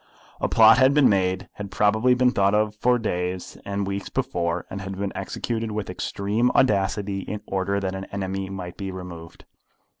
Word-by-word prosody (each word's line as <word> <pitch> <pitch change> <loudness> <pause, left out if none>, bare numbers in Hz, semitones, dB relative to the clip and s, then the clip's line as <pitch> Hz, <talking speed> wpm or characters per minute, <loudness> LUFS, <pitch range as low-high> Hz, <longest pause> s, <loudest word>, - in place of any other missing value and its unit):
A - - 0
plot - - +7
had 135 +2 +5
been 150 -3 +6
made, 95 -1 +1
had 105 -1 -6
probably 110 +5 +3
been 125 0 +3
thought 100 -2 +2
of 105 0 +1
for 125 +3 +2
days 90 -5 -3
and 100 0 -2
weeks 100 0 -4
before, 85 0 -2
and 95 - -5
had 95 0 -6
been 100 0 -2
executed 115 -1 -3
with 105 -3 -4
extreme 105 +6 0
audacity, 100 -3 +2
in 105 +2 -5
order 100 +1 -1
that 95 -1 -3
an 95 0 -5
enemy 95 -1 -4
might 90 -3 -7
be 95 -1 -4
removed. 90 -3 -9
100 Hz, 180 wpm, -24 LUFS, 95-105 Hz, -, plot